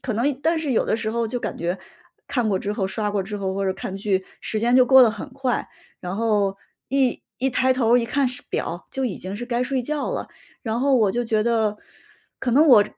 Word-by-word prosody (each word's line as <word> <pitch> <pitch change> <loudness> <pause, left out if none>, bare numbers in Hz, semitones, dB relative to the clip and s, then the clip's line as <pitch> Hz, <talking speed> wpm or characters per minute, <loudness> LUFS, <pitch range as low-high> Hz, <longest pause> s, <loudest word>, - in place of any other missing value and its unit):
可 250 - -3
能 245 +7 +1
但 325 +2 +2
是 305 -3 -2
有 240 - +2
的 - - +1
时 220 -1 -2
候 230 0 0
就 245 +2 -3
感 - - -4
觉， 175 +2 -1 0.5
看 245 -4 0
过 195 - +1
之 200 +2 -2
后 205 -2 -1
刷 210 +2 -1
过 205 -1 0
之 200 +2 -4
后 190 -2 -2
或 195 +1 -2
者 190 - +1
看 190 0 -5
剧， 195 -2 0 0.2
时 215 - -2
间 240 +2 +3
就 255 -1 +6
过 265 0 +8
得 230 - +5
很 225 +6 -7
快。 260 -2 -1 0.3
然 180 +1 -5
后 205 -3 +1 0.3
一 265 -2 +1 0.2
一 265 +2 +1
抬 260 +1 +3
头 240 -2 +3
儿 - - +6
一 230 - -1
看 270 +1 +1
时 250 - -5
表， 175 +2 -3
就 265 - -1
已 230 -7 -2
经 190 +2 -6
是 240 - -5
该 240 0 -1
睡 265 -1 -1
觉 295 +3 -2
了。 - - -4 0.3
然 225 -1 -2
后 275 0 +3
我 220 -6 +4
就 240 +4 -1
觉 220 -1 +1
得， 220 -2 +1 0.6
可 245 - -1
能 290 +5 +6
我 215 -8 +8
230 Hz, 270 characters per minute, -23 LUFS, 205-255 Hz, 0.6 s, 过